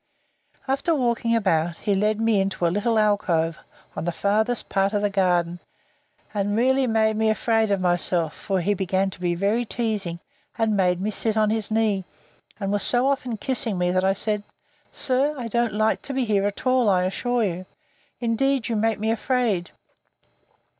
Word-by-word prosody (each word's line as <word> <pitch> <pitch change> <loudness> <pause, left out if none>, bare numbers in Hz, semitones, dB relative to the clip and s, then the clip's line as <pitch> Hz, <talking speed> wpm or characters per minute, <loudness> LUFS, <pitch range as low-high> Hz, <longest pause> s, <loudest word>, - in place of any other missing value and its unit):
After 280 +5 +1
walking 235 -3 +1
about, 170 -6 +1
he 205 - -1
led 210 +2 +1
me 225 -3 +2
into 190 -2 -1
a 170 - +2
little 225 +3 +1
alcove, 175 -7 +1 0.4
on - - -4
the 175 - 0
farther 215 +6 +1
part 195 +1 +1
of 205 0 0
the 205 - +1
garden; 175 -3 +1 0.7
and 205 0 -1
really 260 +2 +3
made 220 -1 +2
me 220 0 +2
afraid 220 0 +1
of 200 -1 +1
myself, 175 -2 0
for 190 -3 -2
he 205 +4 +1
began 190 0 0
to - - -12
be 175 -1 0
very 205 +7 +1
teasing, 210 -7 -3 0.4
and 225 -2 +1
made 180 -2 +2
me 205 +3 -1
sit 220 +1 -1
on 215 -1 +3
his 220 -2 -1
knee; 215 -3 +1 0.6
and 195 -1 -2
was 205 0 0
so 245 +1 +3
often 255 -4 -1
kissing 230 -4 -2
me, 180 0 +1
that 185 0 +1
I 190 0 +3
said, 210 +1 -2 0.5
Sir, 275 +3 +1
I 245 -3 -4
don't 235 -1 0
like 215 +1 +1
to 275 - -5
be 260 -2 +1
here 205 -2 +1
at 205 - -6
all, 255 -3 +3
I 180 -2 +3
assure 240 +6 0
you. 185 -2 -3 0.5
Indeed 245 +2 0
you 230 - 0
make 220 +1 +1
me 220 +2 -1
afraid! 225 -6 0
210 Hz, 185 wpm, -24 LUFS, 190-230 Hz, 0.7 s, really